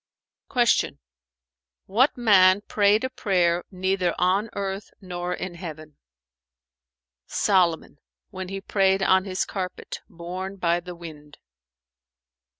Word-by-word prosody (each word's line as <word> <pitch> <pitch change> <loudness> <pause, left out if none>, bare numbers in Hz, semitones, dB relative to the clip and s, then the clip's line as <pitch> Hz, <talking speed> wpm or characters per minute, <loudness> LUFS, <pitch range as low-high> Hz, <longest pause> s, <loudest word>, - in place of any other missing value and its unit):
Q 240 -3 +2 0.9
"What 250 +9 +2
man 200 -4 +5
prayed 205 +1 +2
a 260 - -1
prayer 180 -7 +1
neither 185 -1 0
on 190 +5 +1
earth 195 +1 -4
nor 180 -2 -5
in 180 0 -4
heaven?" 155 -4 -9 1.3
"Solomon, 175 -6 +1 0.3
when 185 -2 -6
he 195 0 -5
prayed 195 -1 +2
on 190 0 +4
his 185 -1 -1
carpet, 185 -2 -5
borne 185 +3 -6
by 175 -2 +1
the 175 0 -9
wind." 150 -3 -11
185 Hz, 110 wpm, -25 LUFS, 175-195 Hz, 1.3 s, man